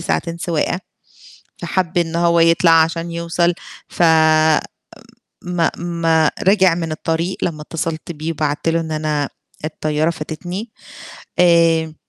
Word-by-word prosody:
ساعتين 170 Hz, 0 st, -2 dB
سواقة، 170 Hz, +1 st, -1 dB, 0.8 s
فَحَب 180 Hz, -2 st, -1 dB
إن 170 Hz, -1 st, -1 dB
هو 170 Hz, 0 st, +3 dB
يطلَع 165 Hz, +1 st, +4 dB
عشان 165 Hz, +1 st, -3 dB
يوصَل 170 Hz, +1 st, 0 dB, 0.3 s
ف -, -, -3 dB, 1.4 s
ما 175 Hz, -2 st, 0 dB
ما 165 Hz, -2 st, +1 dB
رجِع 190 Hz, -3 st, +4 dB
من 165 Hz, -2 st, -3 dB
الطريق 165 Hz, +3 st, -2 dB
لمّا 155 Hz, -3 st, -3 dB
اتصلت 165 Hz, +1 st, -4 dB
بيه 155 Hz, 0 st, -4 dB
وبعت 150 Hz, -1 st, -2 dB
له 165 Hz, 0 st, +1 dB
إن 160 Hz, -1 st, -5 dB
أنا 155 Hz, -2 st, -1 dB, 0.4 s
الطيارة 155 Hz, 0 st, -1 dB
فاتتني. 175 Hz, +7 st, -6 dB, 0.7 s
آآ 165 Hz, -2 st, +3 dB
165 Hz, 120 wpm, -18 LUFS, 160-170 Hz, 1.4 s, يطلَع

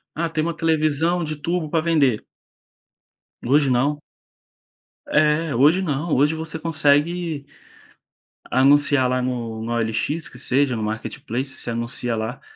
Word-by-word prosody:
ah, 165 Hz, +1 st, -1 dB
tem 155 Hz, -1 st, -1 dB
uma 170 Hz, 0 st, -2 dB
televisão 160 Hz, +2 st, +1 dB
de 155 Hz, -1 st, -4 dB
turbo 165 Hz, 0 st, -2 dB
para 160 Hz, 0 st, 0 dB
vender. 145 Hz, -9 st, +2 dB, 1.2 s
Hoje 140 Hz, +2 st, +3 dB
não. 140 Hz, +4 st, +1 dB, 1.1 s
É, 150 Hz, 0 st, +2 dB
hoje 150 Hz, +9 st, +4 dB
não, 155 Hz, -1 st, -1 dB
hoje 150 Hz, +4 st, +3 dB
você 160 Hz, 0 st, -5 dB
consegue 155 Hz, 0 st, +1 dB, 1.0 s
anunciar 140 Hz, 0 st, +4 dB
lá 125 Hz, 0 st, 0 dB
no 115 Hz, -3 st, -3 dB
na 120 Hz, +1 st, -2 dB
OLX, 115 Hz, +8 st, -1 dB
que 125 Hz, -, -14 dB
seja, 130 Hz, 0 st, +1 dB
no 110 Hz, -, -3 dB
marketplace, 115 Hz, +4 st, -4 dB
você -, -, -4 dB
anuncia 115 Hz, +1 st, -3 dB
lá 110 Hz, +4 st, -4 dB
145 Hz, 135 wpm, -22 LUFS, 125-160 Hz, 1.2 s, hoje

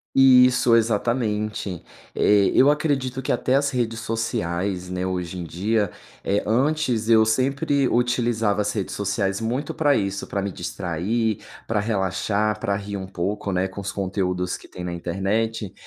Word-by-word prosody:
Isso. 125 Hz, -2 st, +6 dB
exatamente. 110 Hz, -4 st, -1 dB, 0.3 s
Eh, 100 Hz, -1 st, +4 dB
eu 140 Hz, +3 st, +6 dB
acredito 135 Hz, -4 st, 0 dB
que -, -, 0 dB
até 130 Hz, -, 0 dB
as 140 Hz, 0 st, +2 dB
redes 115 Hz, -3 st, -2 dB
sociais, 95 Hz, -5 st, -2 dB
né, 90 Hz, 0 st, -2 dB
hoje 90 Hz, -1 st, -3 dB
em 90 Hz, -, -4 dB
dia 100 Hz, +4 st, 0 dB, 0.3 s
eh, 100 Hz, +1 st, 0 dB
antes 125 Hz, -1 st, +1 dB
eu 110 Hz, -1 st, +6 dB
sempre 135 Hz, +4 st, +1 dB
utilizava 120 Hz, -3 st, +1 dB
as 105 Hz, 0 st, 0 dB
redes 100 Hz, -3 st, -3 dB
sociais 100 Hz, 0 st, -1 dB
muito 125 Hz, +6 st, -2 dB
pra 145 Hz, -3 st, +2 dB
isso. 100 Hz, 0 st, -2 dB
Pra 100 Hz, -, -2 dB
me 100 Hz, -, -3 dB
distrair, 100 Hz, +6 st, -2 dB, 0.3 s
pra 110 Hz, -2 st, 0 dB
relaxar, 105 Hz, +1 st, 0 dB
pra 100 Hz, 0 st, 0 dB
rir 100 Hz, 0 st, -5 dB
um 95 Hz, -, -6 dB
pouco, 95 Hz, +2 st, -3 dB
né, 90 Hz, +1 st, +1 dB
com 95 Hz, -, -8 dB
os 100 Hz, 0 st, -4 dB
conteúdos 90 Hz, -2 st, -2 dB
que -, -, -16 dB
têm 90 Hz, -, -8 dB
na 90 Hz, -, -3 dB
internet. 95 Hz, +4 st, -2 dB
105 Hz, 160 wpm, -23 LUFS, 95-120 Hz, 0.3 s, Isso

